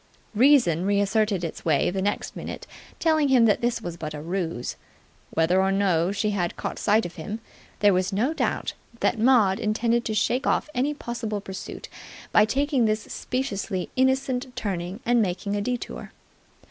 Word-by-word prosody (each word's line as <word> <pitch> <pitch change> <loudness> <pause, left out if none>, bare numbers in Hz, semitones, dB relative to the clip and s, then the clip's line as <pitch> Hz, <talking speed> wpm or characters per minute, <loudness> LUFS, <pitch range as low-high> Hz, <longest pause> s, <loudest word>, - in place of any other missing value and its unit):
Reason 230 - +4
reasserted 200 -1 +1
its 165 - -5
way 160 +1 +2
the 190 +1 -2
next 205 +2 -2
minute, - - -6 0.3
telling 315 -3 +2
him 255 -4 +5
that 210 -3 +3
this 235 -1 0
was 175 -2 -5
but 155 -2 -5
a - - -6
ruse. 170 -7 -3 0.5
Whether 170 +4 +2
or 190 0 +2
no 190 -3 +2
she 210 +1 0
had 180 -4 -1
caught - - -5
sight 215 +2 +3
of 175 - -8
him, 205 +8 -5 0.4
there 205 -1 +6
was 185 +2 +1
no 230 +10 +1
doubt - - -1 0.3
that 235 - +1
Maud 220 -5 +4
intended 230 +2 +1
to 215 - -2
shake 245 +5 +1
off 305 - +1
any 275 +4 0
possible 235 -6 -4
pursuit 190 -1 -8 0.4
by 210 - +6
taking 270 +1 +1
this 215 0 0
speciously 200 -7 -3
innocent 260 -1 +1
turning 190 +1 -4
and 240 0 +3
making 200 +1 -1
a 205 - -1
detour. 245 +3 -4
210 Hz, 170 wpm, -25 LUFS, 190-245 Hz, 0.5 s, there